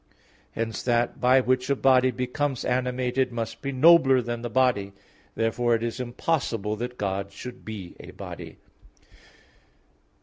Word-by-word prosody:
Hence 115 -1 -3
that 120 -1 0
by 130 +1 +5
which 130 +1 0
a 140 - +3
body 130 -1 +4
becomes 125 +2 -2
animated 125 0 0
must 115 -1 -5
be 140 - -3
nobler 135 -1 +6
than 120 -1 -4
the 120 - -4
body. 115 -5 +1 0.4
Therefore 115 +1 +1
it 115 - -3
is 120 +2 -3
impossible 120 -4 -1
that 125 +2 -5
God 100 0 -3
should 125 +5 -9
be 100 -5 -8
a - - -11
body. - - -9
125 Hz, 140 wpm, -26 LUFS, 115-130 Hz, 0.4 s, nobler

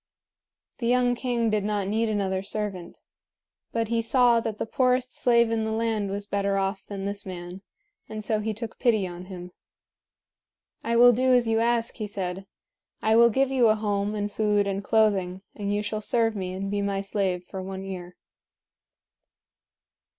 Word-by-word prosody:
The 235 - -1
young 245 0 +3
king 240 -2 0
did 210 -1 +1
not 205 -2 -1
need 220 +2 0
another 195 -3 -1
servant. 195 -3 -5 0.7
But 230 -1 -1
he 230 0 +1
saw 240 0 +4
that 225 -2 -4
the - - -2
poorest 255 +2 +1
slave 235 -2 +3
in 225 -1 0
the 220 - -2
land 220 -2 -1
was 200 +1 -3
better 200 -1 0
off 195 +1 -1
than 195 -1 -5
this 200 0 -3
man, 180 0 -8 0.5
and 215 0 -5
so 215 0 0
he 220 +1 -2
took 220 +1 -7
pity 220 -6 +2
on 175 0 -7
him. 180 -1 -9 1.3
"I 235 - 0
will 245 +1 +8
do 255 +2 +3
as 245 -2 +3
you 225 0 +2
ask," 235 0 0
he 215 -3 -3
said. 190 -1 -4 0.6
"I 220 0 +4
will 235 +1 +7
give 265 +4 +1
you 255 -3 +4
a 215 - +4
home 205 -1 -1
and 205 0 -2
food 210 -1 +1
and 200 0 -2
clothing; 195 -4 +1
and 200 -1 -3
you 205 +1 0
shall 215 +1 -3
serve 225 0 +1
me 185 -2 -4
and 195 +1 -4
be 205 0 0
my 200 -1 -1
slave 195 -3 -1
for 190 +1 -7
one 190 0 -6
year." 180 -2 -7
210 Hz, 180 wpm, -26 LUFS, 195-230 Hz, 1.3 s, will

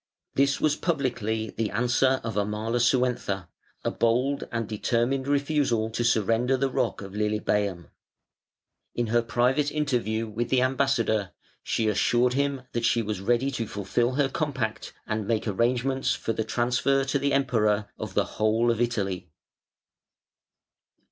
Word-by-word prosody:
This 140 0 +2
was 150 -1 +2
publicly 120 - -1
the 110 -1 -2
answer 125 +3 +2
of 115 -3 -4
Amalasuentha 110 -1 0 0.4
a - - 0
bold 125 +5 +1
and 115 -2 -2
determined 120 +5 0
refusal 140 -6 +1
to 120 - -1
surrender 120 +3 +2
the 135 0 0
rock 105 - -1
of 95 0 -9
Lilybæum. 105 -3 0 1.1
In 120 - 0
her 120 - +5
private 125 +5 +1
interview 120 -7 -1
with 115 +2 -3
the 130 -1 +3
ambassador, 130 -7 +1 0.3
she 110 - -1
assured 120 +4 +2
him 140 -1 0
that 120 - -2
she 120 0 +2
was 105 -3 -3
ready 120 +6 +1
to 115 -5 -3
fulfil 105 +6 -1
her 140 +1 +2
compact 135 -7 -3
and 110 0 -2
to - - -10
make 115 0 0
arrangements 125 +5 +1
for 115 - -2
the 110 - -1
transfer 130 +4 +1
to 135 +1 0
the 140 +1 0
Emperor 110 -6 +2
of - - -6
the - - +3
whole 110 +2 +1
of 115 0 -1
Italy. 100 -7 -1
120 Hz, 145 wpm, -26 LUFS, 110-135 Hz, 1.1 s, her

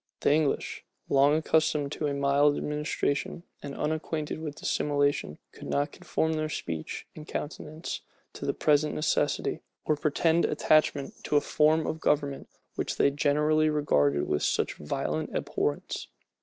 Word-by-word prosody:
The - - +4
English, 155 -2 0 0.3
long 140 +2 +5
accustomed 155 -2 +1
to 150 - -2
a 145 - -1
mild 140 +1 +3
administration, 150 +1 -2 0.2
and 140 -1 -6
unacquainted 155 0 -2
with 150 -2 -5
dissimulation, 145 - 0
could - - -10
not 145 +2 0
conform 160 -2 -1
their 155 0 -1
speech 80 - -4
and 155 -1 -10
countenance 155 +2 -5 0.3
to - - -6
the - - +1
present 150 0 +2
necessity, 155 - 0 0.2
or 155 - +2
pretend 160 +3 +2
attachment 155 -2 +2
to - - 0
a - - +7
form 155 +2 +3
of 160 - -3
government 140 -2 0 0.2
which - - -2
they 140 - +3
generally 150 +2 +2
regarded 70 - +2
with 75 - 0
such - - +1
violent 75 - -3
abhorrence. 75 0 -2
150 Hz, 140 wpm, -28 LUFS, 140-155 Hz, 0.3 s, a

